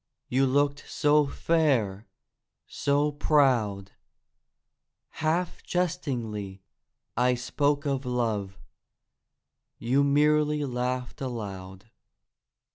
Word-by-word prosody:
You 135 Hz, +2 st, +2 dB
looked 145 Hz, +2 st, 0 dB
so 150 Hz, 0 st, +3 dB
fair, 130 Hz, -11 st, 0 dB, 0.6 s
so 145 Hz, +1 st, 0 dB
proud; 125 Hz, -10 st, +2 dB, 1.2 s
Half 165 Hz, +3 st, -1 dB
jestingly 120 Hz, -, -3 dB, 0.5 s
I 125 Hz, +1 st, +3 dB
spoke 145 Hz, +4 st, 0 dB
of 135 Hz, -2 st, -1 dB
love— 110 Hz, -6 st, -2 dB, 1.2 s
You 130 Hz, +5 st, +2 dB
merely 150 Hz, +1 st, +2 dB
laughed 125 Hz, +1 st, -3 dB
aloud. 100 Hz, -4 st, -6 dB
130 Hz, 75 wpm, -27 LUFS, 115-145 Hz, 1.2 s, so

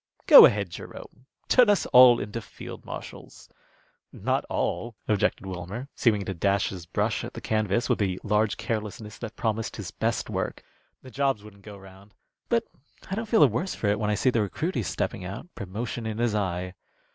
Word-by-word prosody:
"Go -, -, +11 dB
ahead, 100 Hz, -4 st, -2 dB
Jerome. 130 Hz, -, -11 dB, 0.2 s
Turn 250 Hz, -4 st, +5 dB
us 205 Hz, -4 st, +3 dB
all 125 Hz, -1 st, +7 dB
into 105 Hz, +3 st, -5 dB
field -, -, -10 dB
marshals." -, -, -9 dB, 0.6 s
"Not -, -, -1 dB
all," 115 Hz, +6 st, -2 dB
objected 105 Hz, -2 st, 0 dB
Wilmer, 95 Hz, +8 st, -6 dB
seeming 105 Hz, -5 st, +1 dB
to 95 Hz, -, -3 dB
dash 100 Hz, +3 st, +1 dB
his 90 Hz, -3 st, -8 dB
brush -, -, -1 dB
at -, -, -8 dB
the -, -, -5 dB
canvas 110 Hz, +1 st, 0 dB
with -, -, +1 dB
the 95 Hz, -3 st, -1 dB
large 105 Hz, 0 st, +1 dB
carelessness 105 Hz, -1 st, -5 dB
that 115 Hz, -2 st, -7 dB
promised 110 Hz, -1 st, -2 dB
his -, -, -7 dB
best -, -, -2 dB
work. -, -, -4 dB, 0.4 s
"The 130 Hz, -, -12 dB
jobs 135 Hz, -6 st, 0 dB
wouldn't 105 Hz, -1 st, -14 dB
go 105 Hz, 0 st, -11 dB
round. 95 Hz, +1 st, -16 dB, 0.3 s
But -, -, +2 dB, 0.5 s
I -, -, -1 dB
don't 220 Hz, +3 st, -3 dB
feel 225 Hz, -, +4 dB
the 145 Hz, -, +9 dB
worse 125 Hz, -, -2 dB
for 105 Hz, -, -1 dB
it 105 Hz, +1 st, +1 dB
when 105 Hz, -1 st, -1 dB
I 105 Hz, -, +1 dB
see 130 Hz, +5 st, +2 dB
the 115 Hz, -, +1 dB
recruity 135 Hz, -, -2 dB
stepping 95 Hz, 0 st, -3 dB
out, 100 Hz, -, -8 dB
promotion 110 Hz, +4 st, -5 dB
in 110 Hz, -1 st, -4 dB
his 120 Hz, -2 st, 0 dB
eye." 90 Hz, -3 st, -2 dB
105 Hz, 190 wpm, -26 LUFS, 100-120 Hz, 0.6 s, Go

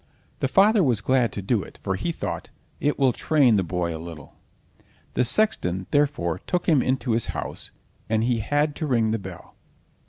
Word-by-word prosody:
The -, -, +1 dB
father 205 Hz, +1 st, +4 dB
was 125 Hz, -8 st, +2 dB
glad 125 Hz, +3 st, +2 dB
to 100 Hz, -, -5 dB
do 105 Hz, +2 st, +1 dB
it, -, -, -11 dB
for -, -, -1 dB
he -, -, -2 dB
thought: -, -, -5 dB, 0.3 s
"It 145 Hz, -, 0 dB
will 135 Hz, -3 st, +3 dB
train 135 Hz, -6 st, +3 dB
the 95 Hz, -, +2 dB
boy 85 Hz, -1 st, -2 dB
a 80 Hz, -, -7 dB
little." 80 Hz, -4 st, -10 dB, 0.8 s
The -, -, +2 dB
sexton, 95 Hz, -, +1 dB
therefore, 135 Hz, -, +1 dB
took 180 Hz, -, -1 dB
him 150 Hz, -6 st, +4 dB
into 130 Hz, -1 st, 0 dB
his 115 Hz, 0 st, +1 dB
house, -, -, -5 dB, 0.4 s
and 110 Hz, 0 st, +1 dB
he 120 Hz, -1 st, +1 dB
had 145 Hz, +6 st, 0 dB
to 155 Hz, -, -2 dB
ring 115 Hz, -5 st, +2 dB
the 115 Hz, -, -1 dB
bell. 95 Hz, -3 st, -10 dB
120 Hz, 190 wpm, -24 LUFS, 95-145 Hz, 0.8 s, father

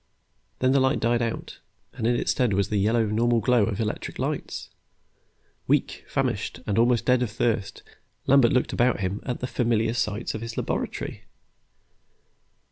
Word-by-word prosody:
Then 130 Hz, 0 st, +2 dB
the 135 Hz, -, +4 dB
light 130 Hz, +2 st, +2 dB
died 120 Hz, +1 st, +1 dB
out, 115 Hz, -1 st, -4 dB, 0.3 s
and 110 Hz, -, -2 dB
in 120 Hz, -, +3 dB
its -, -, 0 dB
stead 125 Hz, -5 st, +1 dB
was 100 Hz, +1 st, +1 dB
the 105 Hz, -, +1 dB
yellow, 110 Hz, +3 st, +2 dB
normal 115 Hz, +2 st, +2 dB
glow 120 Hz, -2 st, +3 dB
of 100 Hz, -3 st, -3 dB
the -, -, 0 dB
electric 105 Hz, -, -4 dB
lights. -, -, -4 dB, 1.0 s
Weak, -, -, +1 dB
famished, -, -, -2 dB
almost 120 Hz, +2 st, +2 dB
dead 125 Hz, -1 st, +3 dB
of 125 Hz, -, 0 dB
thirst, 115 Hz, -2 st, -1 dB, 0.4 s
Lambert 135 Hz, -3 st, +5 dB
looked 125 Hz, -, +1 dB
about 120 Hz, -3 st, +2 dB
him 95 Hz, +2 st, -2 dB
at 125 Hz, -, -3 dB
the -, -, -1 dB
familiar 115 Hz, -3 st, +1 dB
sights 105 Hz, -3 st, -2 dB
of 110 Hz, -, -5 dB
his 115 Hz, 0 st, -6 dB
laboratory. -, -, -3 dB
115 Hz, 165 wpm, -25 LUFS, 110-125 Hz, 1.0 s, Lambert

